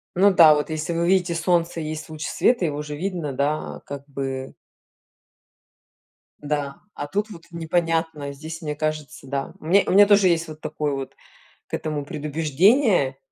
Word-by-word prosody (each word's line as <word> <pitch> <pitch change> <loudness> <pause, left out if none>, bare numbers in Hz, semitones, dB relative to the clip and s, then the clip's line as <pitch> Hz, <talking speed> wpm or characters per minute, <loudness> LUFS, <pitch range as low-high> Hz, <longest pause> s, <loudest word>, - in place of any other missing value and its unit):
Ну 195 +2 +5
да, 160 -3 +8
вот, 150 +2 -2
если 155 +2 -2
вы 170 +1 0
видите, 180 -2 +2
солнце 170 0 +1
и - - -4
есть 155 0 -6
луч 155 -1 -6
света, 235 -8 +2
его 150 -1 -2
же 150 0 -6
видно, 170 -4 -3
да, 140 +3 +1 0.2
а, - - -10
как 140 0 -8
бы. 135 -1 -5 1.9
Да, 145 -1 -2 0.2
а 145 - -5
тут 205 +6 -2
вот 170 -3 -11
непонятно, 165 -3 -1
здесь 160 +4 -8
мне 150 -1 -3
кажется, 155 -2 -4
да. 135 0 -3
У - - -14
меня 195 +4 +5
у - - +1
меня 205 +2 +8
тоже 200 -2 +5
есть 170 -1 +1
вот 155 0 -10
такое 150 -2 -2
вот, 135 -1 -5 0.5
к - - -8
этому 150 -2 -3
предубеждение, 155 - +2
155 Hz, 175 wpm, -23 LUFS, 145-175 Hz, 1.9 s, да